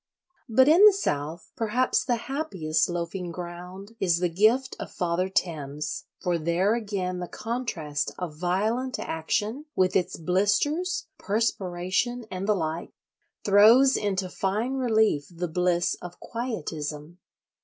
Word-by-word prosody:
But 260 +4 +5
in 335 +6 +7
the 425 -1 +9
South 160 - -3
perhaps 235 +3 +1
the 245 - +1
happiest 195 - -1
loafing 175 +1 -3
ground 180 +4 -8
is 175 -3 +2
the 175 0 0
gift 220 +9 +2
of - - -5
Father 180 +1 -1
Thames; 150 -6 -2 0.2
for 175 -3 0
there 170 +6 +2
again 200 -5 -2
the 175 - -4
contrast 170 -13 -3
of 175 -4 -5
violent 215 +10 0
action, 210 - -2
with 185 -1 +2
its 180 - +1
blisters, 290 - +1
perspiration, 205 +2 -1
and 190 +1 -4
the 210 - +3
like, 160 -2 -3 0.5
throws 225 +7 +6
into 195 -2 -1
fine 205 +7 -1
relief 220 - +2
the 175 0 -4
bliss 175 +1 +1
of 175 0 -9
"quietism." 160 - -5
185 Hz, 130 wpm, -26 LUFS, 170-230 Hz, 0.5 s, the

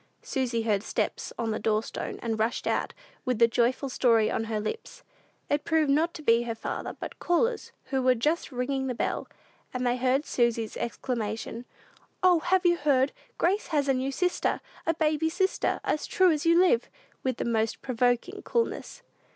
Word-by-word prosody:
Susy 240 -4 -1
heard 210 -3 +1
steps - - -2
on 230 -2 -1
the 215 - -2
door 215 0 +1
stone, - - -5
and 225 -2 -1
rushed 225 +2 0
out, - - 0 0.3
with 255 -3 0
the 230 +1 +6
joyful 245 +4 +1
story 230 -4 +3
on 225 - -1
her 220 -1 -2
lips. 455 - -6 0.4
It 290 0 0
proved 320 -3 +2 0.3
to 310 - -7
be 230 -4 +5
not 240 - -4
her 230 - -2
father, 225 - -5
but - - -7
callers, 450 +6 0 0.2
who 265 -1 +1
were 255 0 +4
just 305 +8 0
ringing 265 +1 -1
the 250 - -2
bell; - - -2 0.4
and 250 0 -2
they 245 0 +2
heard 260 +3 +1
Susy's 235 -2 0
exclamation, 230 -1 -3 0.6
"O, 360 -2 +6
have 370 +3 +1
you 345 0 +5
heard? 275 -3 +2 0.3
Grace 390 +5 +1
has 290 -4 +1
a 270 - +4
new 260 +1 -1
sister, 360 +6 0 0.3
a 330 - +2
baby 315 0 +1
sister, 380 +3 0
as 300 - -1
true 370 -2 +4
as 305 +1 0
you 335 0 +6
live!" 370 +6 +3 0.3
with 255 -2 -1
the - - -2
most 225 -1 0
provoking 250 - 0
coolness. 475 +1 -2
260 Hz, 185 wpm, -28 LUFS, 230-320 Hz, 0.6 s, the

